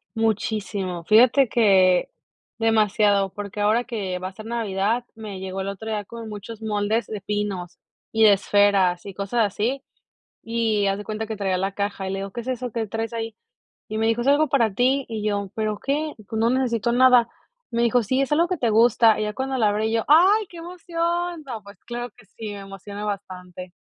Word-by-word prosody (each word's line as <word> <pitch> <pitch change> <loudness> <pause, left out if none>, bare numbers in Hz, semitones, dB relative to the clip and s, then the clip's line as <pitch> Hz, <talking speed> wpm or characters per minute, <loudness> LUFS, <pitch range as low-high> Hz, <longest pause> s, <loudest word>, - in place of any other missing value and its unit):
Muchísimo. 205 -5 -1
Fíjate 245 +6 +5
que 190 -6 +4 0.5
demasiado, 210 -3 +3
porque 205 0 -6
ahora 220 +4 +3
que 200 -7 -4
va 185 +1 -5
a - - -14
ser 215 +2 -11
Navidad, 225 +1 -1
me 210 -4 -7
llegó 190 0 -4
el 195 - -4
otro 200 +3 -6
día 210 -2 -2
como 230 +1 -9
muchos 215 +1 -8
moldes 215 +1 0
de 210 -3 -6
pinos 195 -4 -3 0.3
y 225 0 +2
de 210 -2 +8
esferas 195 -3 +2
y 200 - -7
cosas 205 +4 0
así, 235 +7 -2 0.6
y 225 -3 0
haz 195 0 0
de 205 - -6
cuenta 220 +1 -4
que 220 - -4
traía 190 -2 0
la 195 +1 -2
caja 200 -1 -3
y - - -3
le 195 - -3
digo: 195 0 -5
"¿Qué 240 - -5
es 245 - -12
eso 250 -2 -3
que 225 -1 -2
traes 225 +2 -4
ahí?". 225 -1 -4 0.5
Y 215 - -4
me 220 - +1
dijo: 225 +1 +1
"Es 255 - -2
algo 295 +2 +4
para 240 -7 +2
ti". 260 +4 +2
Y 220 -2 -4
yo: 200 -2 -1
"¿Pero 215 -1 -2
qué? 300 +2 -1
Pues 220 - -3
no 230 +1 +3
necesito 240 -3 0
nada". 250 -1 +5 0.4
Me 235 0 0
dijo: 235 0 +3
"Sí, 260 +6 +1
es 275 - -2
algo 335 +3 +3
que 365 -1 -2
te 240 -5 +1
gusta" 225 0 +5
y - - 0
ya 210 0 -3
cuando 265 +1 -2
la 215 -3 +3
abrí 215 +2 0
yo: 225 -1 +1
"Ay, 380 +8 +5
¡qué 345 - -13
emoción!". 345 0 -3
No, 230 -6 -7
pues 200 0 -14
claro 240 +1 -4
que 230 -4 -19
sí, 220 0 -8
me 200 - -7
emociona 195 +1 -8
bastante, 185 -3 -6
220 Hz, 210 wpm, -23 LUFS, 200-240 Hz, 0.6 s, de